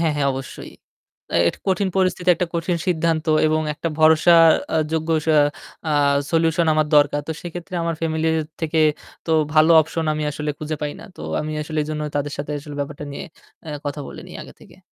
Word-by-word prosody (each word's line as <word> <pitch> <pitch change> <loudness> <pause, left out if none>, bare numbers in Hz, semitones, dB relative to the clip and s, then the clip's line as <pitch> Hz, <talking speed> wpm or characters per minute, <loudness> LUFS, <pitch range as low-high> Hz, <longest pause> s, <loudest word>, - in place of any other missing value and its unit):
হ্যাঁ, 165 -2 +1
হ্যাঁ 140 -1 +1
অবশ্যই। 130 -1 -8 0.6
অ্যা 85 - +2
এটা - - -5
কঠিন 190 +1 +1
পরিস্থিতি 185 -1 0
একটা 180 - -2
কঠিন 170 +1 0
সিদ্ধান্ত 165 -2 0 0.2
এবং 155 0 +1
একটা 165 - -3
ভরসা 160 +2 +6 0.4
আ - - +3 0.2
যোগ্য 160 0 -1 0.2
সা 160 -1 +4 0.5
আ - - +1 0.4
সলিউশন 165 0 +2
আমার 155 0 +2
দরকার। 145 0 +3
তো - - -1
সেক্ষেত্রে 175 +1 -7
আমার 165 0 -1
ফ্যামিলি 160 0 0 0.3
থেকে 160 0 0 0.5
তো - - -2 0.2
ভালো 155 +1 +5
অপশন 160 +1 -3
আমি 155 0 -3
আসলে 150 +1 -3
খুঁজে 155 0 -4
পাই 145 -1 -2
না। - - -11
তো - - -11 0.2
আমি 155 0 -4
আসলে 155 +1 -4
এজন্য 150 0 -4
তাদের 145 0 -2
সাথে 145 +1 -4
আসলে 145 0 -9
ব্যাপারটা 145 +1 -5
নিয়ে - - -6 0.4
অ্যা 150 -2 -6
কথা 145 +1 -4
বলে - - -9
নেই - - -9
আগে - - -13
থেকে। - - -17
155 Hz, 195 wpm, -21 LUFS, 150-165 Hz, 0.6 s, ভরসা